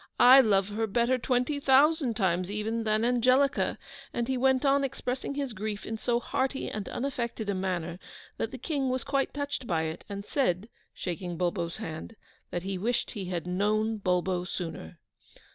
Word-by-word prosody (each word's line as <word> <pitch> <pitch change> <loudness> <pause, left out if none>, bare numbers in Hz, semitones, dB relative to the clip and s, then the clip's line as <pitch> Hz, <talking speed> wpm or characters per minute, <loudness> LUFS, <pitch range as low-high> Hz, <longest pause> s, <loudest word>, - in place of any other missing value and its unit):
I 255 +2 +9
love 200 -4 +2
her 220 +2 -1
better 240 +4 +2
twenty 250 +4 0
thousand 280 -2 +4
times 185 -3 +1
even 220 +2 -2
than 215 +1 +2
Angelica,' 255 +3 +3 0.3
and 235 0 -2
he 265 - 0
went 265 +2 +3
on 275 0 +4
expressing 260 +1 -3
his 275 -4 -2
grief 210 0 -4
in 220 0 -4
so 235 +1 +1
hearty 265 +2 -2
and 210 -2 -4
unaffected 235 -5 -2
a - - -1
manner 180 -2 -2 0.4
that 225 - -1
the 260 - -7
King 270 0 -1
was 255 -1 -1
quite 275 -1 0
touched 285 -3 -3
by 165 -2 +1
it, 160 0 -4
and 200 0 -5
said, 215 - 0 0.2
shaking 175 -1 -4
Bulbo's 170 -1 -1
hand, 160 +7 -6 0.3
that 175 - -3
he 190 -1 -3
wished 235 +5 0
he 200 -5 -5
had 175 -2 -3
known 215 +4 +1
Bulbo 180 -1 +1
sooner. 170 - -6
225 Hz, 175 wpm, -29 LUFS, 185-260 Hz, 0.4 s, I